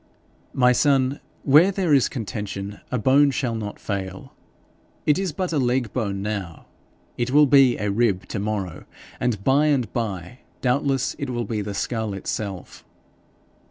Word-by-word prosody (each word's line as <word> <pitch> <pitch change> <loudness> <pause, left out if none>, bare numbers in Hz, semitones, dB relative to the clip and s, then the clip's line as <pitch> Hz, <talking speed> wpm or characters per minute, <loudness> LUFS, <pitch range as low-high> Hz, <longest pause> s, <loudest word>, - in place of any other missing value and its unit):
'My 125 -1 +4
son, 135 +1 +2 0.2
where 150 +7 +6
there 185 -5 +1
is 135 -4 +4
contention, 105 -4 -5
a 125 - 0
bone 135 +5 +4
shall 130 -4 -1
not 105 -2 -5
fail. 95 -2 -5 0.7
It 150 +4 +3
is 190 -3 -1
but 180 +2 -3
a 150 - +2
leg 125 -2 0
bone 100 -5 -2
now; 100 -6 -5 0.5
it 120 +1 0
will 150 +3 +6
be 135 -3 +5
a 105 -1 -1
rib 100 -4 +1
to 105 - -3
morrow, 100 -4 -3 0.3
and 115 -5 -1
by 140 +5 +3
and 130 -7 +1
by 105 -2 -4 0.2
doubtless 135 +1 0
it 140 - -3
will 120 -2 -2
be 105 0 -2
the 100 0 -5
skull 110 -2 -2
itself.' 95 -1 -5
120 Hz, 160 wpm, -23 LUFS, 100-135 Hz, 0.7 s, where